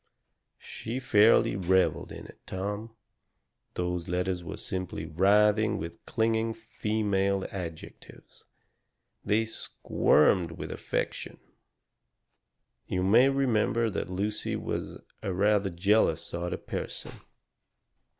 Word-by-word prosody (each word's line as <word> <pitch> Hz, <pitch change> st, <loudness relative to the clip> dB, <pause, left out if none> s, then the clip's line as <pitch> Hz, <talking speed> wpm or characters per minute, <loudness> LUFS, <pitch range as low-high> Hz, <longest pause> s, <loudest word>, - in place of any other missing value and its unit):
She 115 Hz, +3 st, -6 dB
fairly 115 Hz, -5 st, +4 dB
revelled 95 Hz, -3 st, +1 dB
in -, -, -8 dB
it, -, -, -14 dB
Tom. 105 Hz, +4 st, -4 dB, 0.8 s
Those 90 Hz, -1 st, -2 dB
letters 90 Hz, 0 st, -1 dB
were 85 Hz, -, -6 dB
simply 90 Hz, -4 st, -4 dB
writhing 105 Hz, +6 st, +3 dB
with 85 Hz, +1 st, -7 dB
clinging 115 Hz, -1 st, 0 dB
female 105 Hz, -3 st, -1 dB
adjectives. 85 Hz, -4 st, -9 dB, 0.8 s
They 110 Hz, +2 st, +2 dB
SQUIRMED 85 Hz, -5 st, +2 dB
with -, -, -7 dB
affection. -, -, -3 dB, 1.5 s
"You 90 Hz, 0 st, -1 dB
may 115 Hz, +8 st, +6 dB
remember 115 Hz, -4 st, +1 dB
that 95 Hz, -, -3 dB
Lucy 100 Hz, +3 st, -2 dB
was -, -, -4 dB, 0.2 s
a 95 Hz, -, -2 dB
rather 100 Hz, +1 st, +2 dB
jealous 90 Hz, -2 st, +2 dB
sort 85 Hz, +1 st, -4 dB
of -, -, -5 dB
a -, -, -30 dB
person. -, -, -5 dB
100 Hz, 105 wpm, -28 LUFS, 90-110 Hz, 1.5 s, may